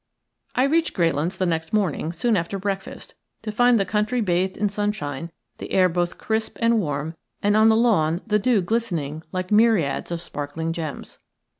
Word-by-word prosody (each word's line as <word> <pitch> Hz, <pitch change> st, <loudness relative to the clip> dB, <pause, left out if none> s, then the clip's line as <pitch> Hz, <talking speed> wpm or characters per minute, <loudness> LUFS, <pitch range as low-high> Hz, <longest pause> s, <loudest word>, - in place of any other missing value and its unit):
I 255 Hz, -, +3 dB
reached 320 Hz, +4 st, +1 dB
Greylands 165 Hz, +1 st, 0 dB
the 185 Hz, -, 0 dB
next 160 Hz, 0 st, -2 dB
morning 180 Hz, -6 st, 0 dB
soon 215 Hz, +7 st, +1 dB
after 180 Hz, +2 st, -1 dB
breakfast, 195 Hz, 0 st, -5 dB, 0.3 s
to 215 Hz, -, -3 dB
find 245 Hz, +1 st, +4 dB
the 195 Hz, -, +1 dB
country 215 Hz, +5 st, 0 dB
bathed 185 Hz, -2 st, 0 dB
in 210 Hz, -, +1 dB
sunshine, 195 Hz, -8 st, -3 dB, 0.3 s
the -, -, -7 dB
air 185 Hz, -1 st, +5 dB
both 175 Hz, 0 st, -1 dB
crisp 220 Hz, 0 st, -2 dB
and 230 Hz, -1 st, +3 dB
warm, 150 Hz, -2 st, -3 dB, 0.3 s
and 205 Hz, +1 st, +3 dB
on 220 Hz, +1 st, +6 dB
the 220 Hz, -, +5 dB
lawn 185 Hz, -8 st, +2 dB
the 210 Hz, -1 st, +2 dB
dew 215 Hz, -2 st, +2 dB
glistening 170 Hz, -9 st, -2 dB
like 185 Hz, +1 st, -4 dB
myriads 210 Hz, -9 st, +3 dB
of 170 Hz, -1 st, -3 dB
sparkling 160 Hz, 0 st, -4 dB
gems. 160 Hz, -4 st, -6 dB
190 Hz, 175 wpm, -23 LUFS, 165-220 Hz, 0.3 s, on